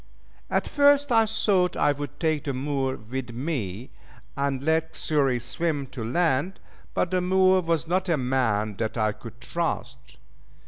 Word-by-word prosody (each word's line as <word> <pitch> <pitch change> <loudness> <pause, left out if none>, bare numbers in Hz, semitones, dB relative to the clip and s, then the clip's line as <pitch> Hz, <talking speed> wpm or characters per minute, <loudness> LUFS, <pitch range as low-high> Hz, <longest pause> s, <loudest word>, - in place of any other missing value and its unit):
At - - +1
first 285 -1 +4
I 225 -2 +5
thought 195 -4 +1
I 145 - +3
would 145 0 -6
take 155 -2 0
the 140 - -1
Moor 135 0 -1
with 125 +4 -6
me, 120 - -4 0.4
and 140 -1 -1
let 160 +1 0
Xury 135 -5 +1
swim 145 +4 -2
to 125 - -6
land; 160 +6 0 0.4
but 175 - 0
the 185 -1 +1
Moor 185 +1 +4
was 165 -4 -1
not 185 +2 0
a 165 - +3
man 115 -6 0
that 110 +1 -2
I 110 -1 +2
could 115 +2 -11
trust. 135 -5 -4
145 Hz, 155 wpm, -26 LUFS, 125-170 Hz, 0.4 s, I